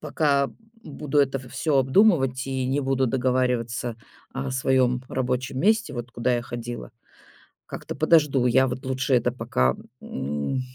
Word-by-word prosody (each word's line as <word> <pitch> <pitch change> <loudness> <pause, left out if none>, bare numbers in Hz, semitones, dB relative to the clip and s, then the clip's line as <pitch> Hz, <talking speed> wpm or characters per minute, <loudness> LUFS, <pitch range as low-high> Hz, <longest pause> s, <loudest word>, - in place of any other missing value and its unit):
пока 145 -2 +1 0.3
буду 150 0 -2
это 135 0 +1
в 130 -1 -12
всё 150 0 0
обдумывать 135 - +3
и 130 -1 -2
не 135 +3 0
буду 135 -1 +1
договариваться 125 -2 0 0.4
о 135 0 -3
своём 130 -1 +2
рабочем 130 +1 -2
месте, 215 -6 +2
вот 120 0 -6
куда 120 +1 0
я 120 - -3
ходила, 120 0 -7 0.8
как-то - - -7
подожду. 150 -5 +3
Я 130 +2 +4
вот 130 +1 -6
лучше 130 +1 0
это 120 -1 +2
пока, 85 - 0 0.3
м, 75 - -3
130 Hz, 145 wpm, -24 LUFS, 125-135 Hz, 0.8 s, Я